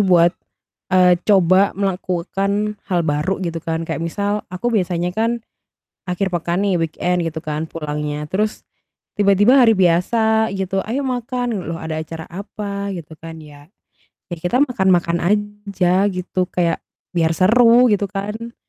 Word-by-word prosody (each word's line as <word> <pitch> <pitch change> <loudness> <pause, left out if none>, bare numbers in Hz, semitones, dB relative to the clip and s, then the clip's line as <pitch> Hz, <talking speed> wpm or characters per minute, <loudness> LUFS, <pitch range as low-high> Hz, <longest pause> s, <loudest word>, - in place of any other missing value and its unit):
buat, 175 -3 +5 0.6
eee, 180 -1 +5
coba 190 -1 +4
melakukan 195 +2 -1
hal 180 -2 +2
baru 150 +5 0
gitu 165 -1 -4
kan 165 +1 -3
kayak 165 - -4
misal, 205 +5 -2
aku 210 +7 -2
biasanya 180 -3 0
kan 230 +3 0 0.7
akhir 180 +2 -1
pekan 175 +1 -1
nih 200 -3 +1
weekend 170 +2 -1
gitu 160 -1 -4
kan 155 -1 -3
pulangnya. 150 -1 -4
Terus, 210 +3 -1 0.6
tiba-tiba 205 +6 +5
hari 240 -3 +6
biasa 220 +5 +2
gitu, 190 0 -2
"Ayo, 250 +6 -2
makan!" 245 -2 -2
L 175 -3 -5
loh - - -6
ada 160 -1 -4
acara 160 +1 -7
apa? 200 +1 -5
Gitu 160 -3 -9
kan 165 0 -9
ya. 145 -1 -14 0.7
Ya - - -2
kita 180 +9 0
makan-makan 185 -9 +1
aja 200 -1 +1
gitu 180 0 -2
kayak 170 -2 0 0.3
biar 165 -2 +2
seru 235 +6 +5
gitu 200 -1 0
kan. 210 +4 -5
185 Hz, 145 wpm, -19 LUFS, 170-205 Hz, 0.7 s, hari